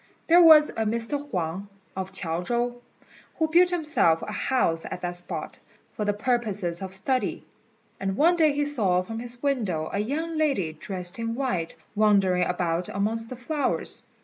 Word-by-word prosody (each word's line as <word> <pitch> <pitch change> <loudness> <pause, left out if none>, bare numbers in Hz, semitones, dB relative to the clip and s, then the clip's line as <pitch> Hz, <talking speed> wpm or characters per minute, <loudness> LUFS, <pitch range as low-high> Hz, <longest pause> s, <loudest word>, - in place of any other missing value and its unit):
There 345 +2 +6
was 310 -3 +8
a - - -15
Mr. 235 +7 -1
Huang, 180 - -3 0.3
of 190 0 -4
Chiao 170 -3 -3
chow, 240 +5 -1 0.6
who 320 - +1
built 350 +3 +5
himself 305 - +2
a - - -5
house 210 -10 0
at 180 - -6
that 175 0 -3
spot, 175 0 -5 0.4
for 210 - -2
the 205 - +1
purposes 205 -6 -1
of 190 -1 -5
study; 255 +7 -1 0.5
and 195 0 -2
one 340 +4 +4
day 315 -3 +4
he 290 +1 0
saw 200 -11 +1
from 225 +4 -6
his 240 +1 -7
window 210 - -1
a 200 - 0
young 310 +9 -2
lady 235 - 0
dressed 180 +4 -4
in 230 0 -2
white 210 -11 -2 0.2
wandering 195 -4 +3
about 175 -1 -1
amongst 225 +3 -2
the 255 - -6
flowers. 285 +4 -2
215 Hz, 170 wpm, -26 LUFS, 180-280 Hz, 0.6 s, was